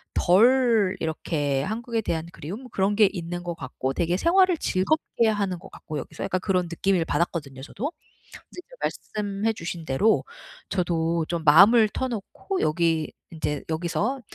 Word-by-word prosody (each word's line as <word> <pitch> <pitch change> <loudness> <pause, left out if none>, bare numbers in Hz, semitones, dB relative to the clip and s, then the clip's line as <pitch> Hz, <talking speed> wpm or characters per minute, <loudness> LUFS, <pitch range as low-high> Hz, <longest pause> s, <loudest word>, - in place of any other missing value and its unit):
덜 225 0 +4
이렇게 145 -3 -1
한국에 230 - -2
대한 165 -6 -2
그리움? 210 - -8
그런 195 +2 +1
게 215 0 +6
있는 175 -2 -5
것 175 -1 -3
같고 130 -1 -4
되게 170 +5 0
생활을 365 - +4
즐겁게 230 - +1
하는 200 -4 -1
것 195 - -13
같고 155 -2 -6
여기서 - - -7
약간 185 - -1
그런 185 -2 +1
느낌을 175 +1 0
받았거든요, 145 -7 -2
저도. 260 - -4 0.4
근데 - - -14
이제 - - -17
말씀해 210 +1 -2
주신 170 -2 -6
대로 195 +12 +2 0.5
저도 170 -3 0
좀 170 -2 -3
마음을 205 +9 +7
터놓고 255 - -4
여기 160 0 +1 0.2
인제 150 -3 -3
여기서 180 +11 -1
185 Hz, 320 characters per minute, -25 LUFS, 165-220 Hz, 0.5 s, 마음을